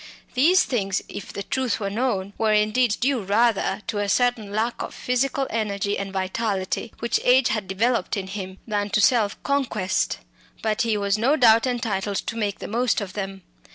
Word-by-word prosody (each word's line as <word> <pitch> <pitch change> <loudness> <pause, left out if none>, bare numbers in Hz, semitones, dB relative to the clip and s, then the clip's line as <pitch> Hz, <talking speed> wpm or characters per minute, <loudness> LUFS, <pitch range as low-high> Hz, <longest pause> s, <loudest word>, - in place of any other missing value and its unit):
These 325 +9 +5
things, 195 -6 -1
if 200 - -8
the 200 - -5
truth 260 +1 -1
were 200 -2 -2
known, 205 -4 -1
were 220 -1 +3
indeed 215 +2 +2
due 260 -1 +1
rather 205 0 +1
to 215 -3 -2
a 205 -1 -1
certain 240 -2 +1
lack 220 +3 -1
of - - -6
physical 270 +2 0
energy 205 -2 -1
and 195 0 -4
vitality, 195 +2 -2
which 235 - 0
age 250 +1 +5
had 215 -3 -2
developed 230 +4 0
in 195 - -3
him, 190 -1 -6
than 205 -1 -1
to 210 - +1
self 215 -2 +3
conquest; 235 -9 0 0.5
but 220 -1 +1
he 225 -3 +1
was 200 0 0
no 265 +7 +3
doubt 230 -3 +5
entitled 210 -5 -1
to 230 - -3
make 205 -3 -1
the - - -7
most 240 +3 +1
of 195 -3 -6
them. 195 -2 -5
215 Hz, 185 wpm, -24 LUFS, 200-240 Hz, 0.5 s, These